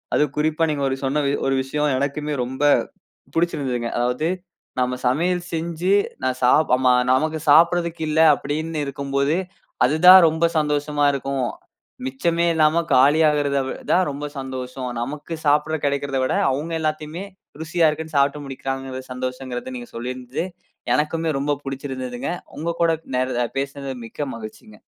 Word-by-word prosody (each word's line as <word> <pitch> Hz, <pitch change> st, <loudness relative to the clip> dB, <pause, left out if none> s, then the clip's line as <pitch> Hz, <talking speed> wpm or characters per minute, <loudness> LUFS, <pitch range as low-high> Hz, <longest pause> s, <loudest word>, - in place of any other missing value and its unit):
அதுவும் 150 Hz, -2 st, +1 dB
குறிப்பா 155 Hz, +2 st, +1 dB
நீங்க 140 Hz, -2 st, -2 dB
ஒரு 135 Hz, -, -2 dB
சொன்ன 145 Hz, +2 st, 0 dB, 0.2 s
ஒரு 135 Hz, -, +2 dB
விஷயம், 150 Hz, +3 st, -1 dB
எனக்குமே 145 Hz, +2 st, -2 dB
ரொம்ப 130 Hz, +3 st, -7 dB, 0.7 s
புடுச்சுருந்ததுங்க. 135 Hz, -8 st, 0 dB
அதாவது 125 Hz, +6 st, 0 dB, 0.5 s
நம்ம 125 Hz, 0 st, 0 dB
சமையல் 175 Hz, +7 st, +1 dB
செஞ்சு, 170 Hz, +3 st, 0 dB, 0.3 s
நான் 130 Hz, 0 st, -1 dB
சாப் 150 Hz, +5 st, +4 dB
ஆமா. 130 Hz, 0 st, +3 dB, 0.2 s
நமக்கு 155 Hz, +4 st, +1 dB
சாப்பிட்றதுக்கு 170 Hz, +1 st, +4 dB
இல்ல, 160 Hz, -, +1 dB, 0.2 s
அப்டின்னு 155 Hz, +2 st, -3 dB
இருக்கும்போது 140 Hz, +3 st, -1 dB, 0.5 s
அதுதான் 180 Hz, +7 st, +8 dB
ரொம்ப 160 Hz, +2 st, +1 dB
சந்தோஷமா 150 Hz, 0 st, 0 dB
இருக்கும். 135 Hz, -1 st, -2 dB, 0.6 s
மிச்சமே 165 Hz, +6 st, 0 dB
இல்லாம 160 Hz, +1 st, +3 dB
காலியாகறது 145 Hz, +1 st, +4 dB
வி -, -, -3 dB, 0.2 s
தான் 185 Hz, -, +4 dB
ரொம்ப 145 Hz, +1 st, -5 dB
சந்தோஷம். 130 Hz, -1 st, -5 dB
நமக்கு 145 Hz, +6 st, -5 dB
சாப்பட 150 Hz, +2 st, +2 dB
கிடைக்கிறத 140 Hz, -1 st, -1 dB
விட, -, -, 0 dB, 0.2 s
அவுங்க 150 Hz, +5 st, -3 dB
எல்லாத்தையுமே 155 Hz, +3 st, -3 dB, 0.4 s
ருசியா 165 Hz, 0 st, +2 dB
இருக்குனு 155 Hz, 0 st, -5 dB
சாப்பட்டு 140 Hz, +1 st, +2 dB
முடிக்குறாங்கறது 135 Hz, -1 st, -5 dB
சந்தோஷங்கறதா, 130 Hz, 0 st, -5 dB
நீங்க 120 Hz, -1 st, -9 dB
சொல்லியிருந்து, 125 Hz, +5 st, -4 dB, 0.5 s
எனக்குமே 160 Hz, +2 st, 0 dB
ரொம்ப 145 Hz, +1 st, 0 dB
புடுச்சுருந்ததுங்க. 130 Hz, -1 st, -4 dB, 0.3 s
உங்க 165 Hz, +2 st, -2 dB
கூட, 165 Hz, -1 st, +4 dB, 0.2 s
நே 125 Hz, -, +2 dB, 0.4 s
பேசினது 140 Hz, -1 st, -4 dB
மிக்க 145 Hz, +6 st, -5 dB
மகிழ்ச்சிங்க. 110 Hz, -1 st, -10 dB
145 Hz, 130 wpm, -22 LUFS, 130-160 Hz, 0.7 s, அதுதான்